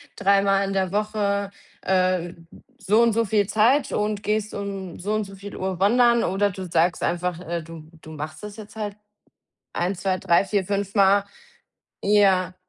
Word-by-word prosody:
dreimal 195 0 +3
in 195 - -3
der 190 -1 0
Woche, 200 -1 -1 0.3
äh, 185 -2 +1 0.5
so 215 +4 +3
und 235 - +4
so 230 +1 +1
viel 205 -1 +2
Zeit 250 +7 +2
und 210 0 -1
gehst 215 0 -1
um 195 -3 -6
so 205 +4 -2
und 215 -1 0
so 195 0 -11
viel 200 +1 -9
Uhr 185 -1 -3
wandern 235 +4 +4
oder 195 +3 +1
du 190 0 -7
sagst 170 +2 +1
einfach, 175 0 -1
äh, 170 -1 -4
du 165 0 -11 0.2
du 160 - -11
machst 155 +3 -7
das 210 0 -8
jetzt 215 -1 -12
halt 205 -2 -4 0.8
1, 180 +3 -1
2, 185 +1 -1
3, 170 +1 +3
4, 195 -1 -1
5 200 +1 -3
Mal 200 0 +4 0.8
ja. 195 -3 +3
200 Hz, 175 wpm, -23 LUFS, 185-210 Hz, 0.8 s, und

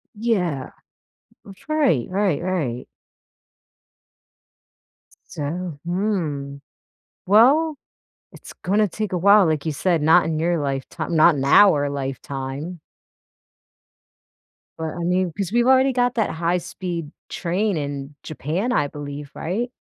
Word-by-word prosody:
Yeah. 180 - -1 0.7
That's 195 +7 -15
right, 285 - +2
right, 190 -5 0
right. 155 -10 -2 2.3
S - - -23
so, 160 +1 -5
hmm, 170 -7 -2 0.7
well, 275 - +5 0.6
it's - - -13
gonna 205 +3 +1
take 215 +3 -4
a - - +1
while, 200 +3 +6
like 155 -2 -1
you 160 - 0
said, 170 +2 0
not 160 +4 +5
in 160 -1 -1
your 170 +1 +1
lifetime 140 +4 -4
not 160 +1 +6
in 135 - -2
our 145 -2 +5
lifetime. 135 +4 -5 2.0
But, 160 -1 -4
I - - -3
mean, 180 0 +1
'cause 195 -3 -3
we've 240 +1 +2
already 265 +1 +5
got 245 -1 +1
that 220 -3 +1
high-speed 170 -1 -3 0.2
train 190 +2 -1
in 140 -1 -5
Japan, 160 - -3
I 145 -11 +1
believe, 145 0 -8
right? 225 +9 -3
170 Hz, 120 wpm, -22 LUFS, 145-200 Hz, 2.3 s, while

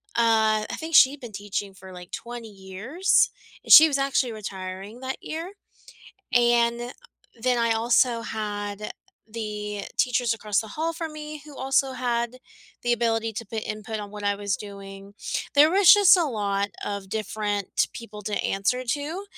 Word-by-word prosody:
uh, 220 -2 +3
I - - -3
think 320 -1 -3
she'd 270 +2 +6
been 240 -4 -9
teaching 200 0 -4
for, 190 0 -12
like, 180 -1 -11
20 235 -1 -7
years, 200 - +1 0.3
and - - -4
she 320 +1 +11
was 280 - 0
actually 275 -3 +1
retiring 195 +1 -7
that 260 +1 -4
year. 335 +5 -6 0.8
And 240 0 +2 0.5
then 250 +1 +1
I 230 -1 +2
also 235 +1 +2
had 205 -1 -4 0.4
the 210 -2 -5 0.2
teachers 245 -2 +2
across 210 -2 0
the 220 - -8
hall 325 +7 -2
from 320 -1 -5
me 300 -1 -8
who 300 -1 -12
also 270 0 +1
had 240 -1 -2 0.5
the 240 0 +1
ability 225 -1 0
to 230 - -5
put 220 +1 -4
input 215 +1 -5
on 205 -1 -8
what 210 0 -8
I 205 0 +2
was 200 -1 -2
doing. 200 -1 -10 0.4
There 295 +2 +7
was 385 -1 +7
just 405 -2 +7
a 350 - +2
lot 200 -6 -1 0.2
of 200 -2 -5
different 210 -1 -1
people 215 -3 -9
to 210 - -5
answer 200 +6 0
to. 295 +9 -3
225 Hz, 165 wpm, -25 LUFS, 205-260 Hz, 0.8 s, she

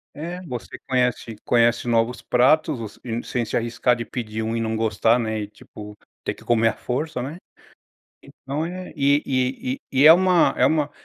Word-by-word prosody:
É, 175 +4 -6
você 125 -7 -7
conhece 125 -3 0
conhece 120 0 +2
novos 115 +1 +1
pratos, 140 +4 +2
você 110 -2 -8
e 115 -1 -3
sem 120 -2 -2
se - - -4
arriscar 120 +1 +1
de 120 - -4
pedir 110 -2 -5
um 115 +1 -2
e - - -1
não 110 0 -2
gostar 110 +1 +2
né, 110 -2 -2
e 105 - -4
tipo, 105 0 -12 0.3
ter - - -1
que - - -17
comer 115 -1 +2
a - - -3
força, 130 +2 -3
né. 145 +7 -6 0.9
Então, 140 +4 -5
é 180 +2 -6
e 140 +1 +3
e 130 - -1 0.2
e 130 - +1
e 145 - +7
é 160 - +12
uma 180 -1 +3
é - - +3
uma 150 -2 +1
125 Hz, 195 wpm, -23 LUFS, 115-145 Hz, 0.9 s, é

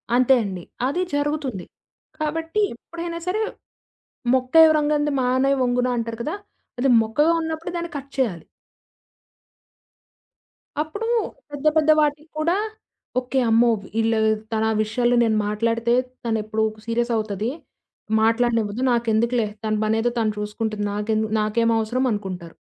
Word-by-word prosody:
అంతే 255 +1 +5
అండి. 185 -4 -5 0.2
అది 350 +7 -1
జరుగుతుంది. 290 - -2 0.5
కాబట్టి, 325 +6 -1
ఎప్పుడైనా 335 +5 -6
సరే 425 +4 0 0.9
'మొక్కై 260 +5 +5
వ్రంగనిది 295 -1 +1
మానై 260 +2 +2
వంగున' 250 0 +1
అంటారు 230 -1 -3
కదా! 315 - -2 0.4
అది 270 +1 +2
మొక్కగా 295 +10 +2
ఉన్నప్పుడే 320 +2 -4
దాన్ని 340 0 -4
కట్ 275 0 -9
చేయాలి. 210 -11 -1 2.4
అప్పుడు 410 +9 -4 0.4
పెద్ద 290 +1 -2
పెద్ద 310 0 +3
వాటికి 300 +1 0
కూడా 340 +5 +2 0.6
ఓకే. 255 +1 -1
అమ్మో! 235 +1 +5
వి 195 - -12
ఈళ్ళు 225 0 +2 0.3
తన 220 0 +1 0.2
విషయాలు 240 +3 +1
నేను 220 -2 +2
మాట్లాడితే 230 +2 0 0.3
తనెప్పుడు 220 -1 -1 0.2
సీరియస్ 235 +1 0
అవుతది. 215 +1 -2 0.7
మాట్లాడనివ్వదు. 230 -1 +1
నాకెందుకులే 235 0 +1 0.2
తన 215 - 0
పనేదో 225 +2 +1
తను 215 -1 +1
చూసుకుంటుంది. 210 0 -3
నాకేందు 215 +1 0
నాకేం 230 +2 +1
అవసరం 245 +4 0
అనుకుంటారు. 185 -5 -5
240 Hz, 120 wpm, -23 LUFS, 220-295 Hz, 2.4 s, అంతే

